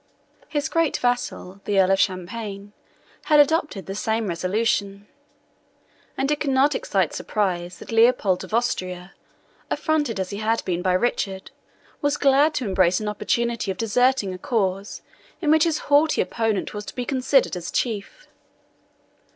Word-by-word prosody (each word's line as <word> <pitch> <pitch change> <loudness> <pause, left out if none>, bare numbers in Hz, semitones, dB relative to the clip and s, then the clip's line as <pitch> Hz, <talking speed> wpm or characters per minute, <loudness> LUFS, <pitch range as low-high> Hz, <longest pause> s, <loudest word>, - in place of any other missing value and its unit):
His 295 0 -1
great 330 -3 +1
vassal, 245 -6 -2
the 200 -1 +2
Earl 190 0 +4
of 195 - +3
Champagne, 200 +2 -3 0.5
had 300 -1 +5
adopted 290 - +2
the 195 - -5
same 220 +2 -1
resolution; 200 +2 -1 1.1
and 275 +2 0
it 300 - 0
could 290 - -1
not 270 +2 +3
excite - - 0
surprise 180 -4 -2
that - - -10
Leopold 225 -5 +3
of - - -10
Austria, 185 -6 -2 0.6
affronted 295 - 0
as 190 -1 -3
he 200 - -4
had 220 +2 -1
been 175 -1 -1
by 185 0 +1
Richard, 190 -1 -1 0.5
was 290 -1 +1
glad 285 +2 +4
to 255 - -1
embrace 185 -2 +2
an 215 - -4
opportunity 230 +1 -1
of 190 - -3
deserting 235 -2 +1
a 185 - -8
cause 195 -2 -2 0.4
in 305 -4 +1
which 315 +1 +5
his 325 -2 +1
haughty 295 +2 +3
opponent 225 -4 -1
was 210 0 -6
to - - -9
be 250 - -3
considered 265 -1 +2
as 175 -1 -5
chief. 235 - -3
220 Hz, 155 wpm, -23 LUFS, 190-265 Hz, 1.1 s, had